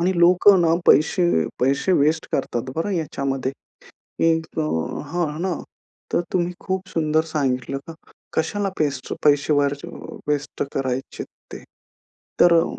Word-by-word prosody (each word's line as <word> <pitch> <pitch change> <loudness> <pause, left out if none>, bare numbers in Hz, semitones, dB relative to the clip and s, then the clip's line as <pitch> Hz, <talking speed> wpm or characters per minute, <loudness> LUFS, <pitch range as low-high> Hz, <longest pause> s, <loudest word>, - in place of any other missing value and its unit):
आणि 180 +2 +2
लोकं 180 +3 +6
ना 165 -1 +4
पैसे 175 +4 +5 0.3
पैसे 140 +8 +2
वेस्ट 155 +2 +1
करतात 130 -1 -2
बरं 165 +6 -1
याच्यामध्ये. 140 -6 -2 0.7
की 165 - +4 0.3
अ - - +2 0.5
हां 175 -1 0
ना. 185 +1 0 0.6
तर - - +3
तुम्ही 175 -1 0
खूप 190 0 -3
सुंदर 155 -1 +1
सांगितलं 135 -3 -1
का? 165 - -8 0.4
कशाला 200 +5 0
पेस्ट 140 -4 -1
पैसे 145 0 +4
वरचे 145 -1 0 0.4
वेस्ट 145 -1 -1
करायचे 130 0 -3 0.3
ते. - - -8 0.8
तर 175 - +7
अ, - - +1
155 Hz, 130 wpm, -22 LUFS, 140-175 Hz, 0.8 s, तर